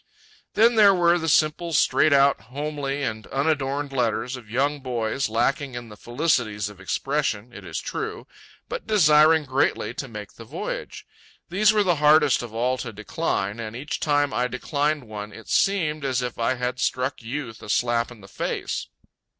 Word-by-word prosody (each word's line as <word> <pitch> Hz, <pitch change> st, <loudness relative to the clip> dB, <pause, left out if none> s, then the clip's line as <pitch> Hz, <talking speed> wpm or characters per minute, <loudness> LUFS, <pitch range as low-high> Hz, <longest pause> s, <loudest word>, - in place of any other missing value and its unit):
Then 230 Hz, +2 st, +5 dB
there 200 Hz, -2 st, +7 dB
were 175 Hz, 0 st, +4 dB
the 165 Hz, 0 st, -1 dB
simple 155 Hz, +3 st, +2 dB
straight 155 Hz, +1 st, +4 dB
out, 140 Hz, -3 st, +4 dB
homely, 145 Hz, +2 st, -3 dB
and 110 Hz, -3 st, -4 dB
unadorned 140 Hz, -1 st, -1 dB
letters 125 Hz, 0 st, 0 dB
of 120 Hz, -4 st, -11 dB
young 140 Hz, +5 st, 0 dB
boys, 125 Hz, -1 st, -2 dB
lacking 125 Hz, +4 st, 0 dB
in 120 Hz, -1 st, -7 dB
the 105 Hz, -, -11 dB
felicities 120 Hz, -5 st, -1 dB
of 100 Hz, -2 st, -14 dB
expression, 120 Hz, +2 st, -2 dB
it 100 Hz, -, -10 dB
is -, -, -6 dB
true, -, -, -5 dB, 0.4 s
but -, -, -6 dB
desiring 155 Hz, -6 st, +5 dB
greatly 130 Hz, 0 st, 0 dB
to 135 Hz, -, -5 dB
make 105 Hz, -4 st, -9 dB
the 115 Hz, -, -11 dB
voyage. 110 Hz, -, -6 dB, 0.4 s
These 205 Hz, +4 st, +4 dB
were 210 Hz, -1 st, +3 dB
the 175 Hz, -4 st, +2 dB
hardest 150 Hz, -2 st, +5 dB
of 120 Hz, -2 st, -7 dB
all 125 Hz, +3 st, 0 dB
to 120 Hz, -, -5 dB
decline, 105 Hz, -1 st, -2 dB
and 110 Hz, 0 st, -6 dB
each 140 Hz, +5 st, -4 dB
time 145 Hz, -2 st, +1 dB
I 125 Hz, +1 st, +1 dB
declined 145 Hz, +3 st, -1 dB
one 105 Hz, -2 st, -7 dB
it 115 Hz, -, -12 dB
seemed 155 Hz, -7 st, +1 dB
as 130 Hz, -2 st, 0 dB
if 125 Hz, -1 st, -5 dB
I 115 Hz, +3 st, +1 dB
had 125 Hz, 0 st, -3 dB
struck 130 Hz, +1 st, -1 dB
Youth 120 Hz, -1 st, -6 dB
a -, -, -10 dB
slap 120 Hz, +2 st, +1 dB
in 120 Hz, -4 st, -13 dB
the 95 Hz, -, -13 dB
face. -, -, -3 dB
135 Hz, 175 wpm, -24 LUFS, 115-150 Hz, 0.4 s, there